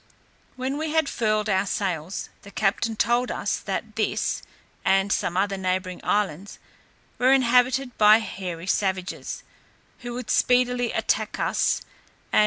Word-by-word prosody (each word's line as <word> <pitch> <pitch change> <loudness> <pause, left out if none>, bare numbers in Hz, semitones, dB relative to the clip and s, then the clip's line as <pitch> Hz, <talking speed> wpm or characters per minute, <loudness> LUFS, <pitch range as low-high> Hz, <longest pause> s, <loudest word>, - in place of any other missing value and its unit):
When 265 +3 -3
we 315 0 -2
had 320 -2 +3
furled 215 -3 0
our 195 -1 +1
sails, 185 -3 -3
the 200 - -12
captain 215 +2 0
told 240 +3 +2
us, - - -2
that - - -4
this, - - 0 0.4
and 195 +1 +2
some 175 - 0
other 195 0 +1
neighbouring 185 -1 -2
islands, 200 -2 -1 0.6
were 255 +1 +4
inhabited 255 0 +3
by 210 0 +8
hairy 185 -6 -5
savages, 190 -1 -2 0.6
who 240 -1 -6
would 245 -2 -4
speedily 250 -1 +2
attack - - -1
us; - - +1 0.5
and. - - +5
210 Hz, 135 wpm, -25 LUFS, 190-245 Hz, 0.6 s, by